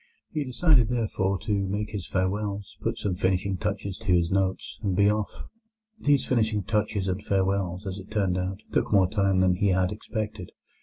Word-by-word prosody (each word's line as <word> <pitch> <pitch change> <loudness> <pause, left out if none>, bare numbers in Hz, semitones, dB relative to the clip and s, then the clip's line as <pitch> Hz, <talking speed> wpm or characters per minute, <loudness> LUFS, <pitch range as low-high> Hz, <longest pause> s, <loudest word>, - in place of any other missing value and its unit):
He 150 - -1
decided, 130 -2 +3
therefore, 105 -5 0
to 105 - -1
make 100 +1 -1
his 100 -4 -5
farewells, 100 +1 -2
put - - -1
some 100 - -1
finishing 95 +1 0
touches 100 -2 -3
to 110 - -12
his 85 0 +2
notes, 95 -1 -1
and 95 -3 0
be 100 +2 +5
off. 105 -1 -3 0.6
These 145 -2 +3
finishing 110 -4 +1
touches 105 -1 0
and 95 +2 -2
farewells, 95 -1 0
as 95 0 -4
it 95 - -11
turned 100 -4 +1
out, 95 +2 -3
took - - 0
more 95 -3 +5
time 100 -1 +2
than 90 -1 +3
he 100 - +2
had 95 -1 +2
expected. 105 -3 -5
100 Hz, 185 wpm, -27 LUFS, 95-105 Hz, 0.6 s, be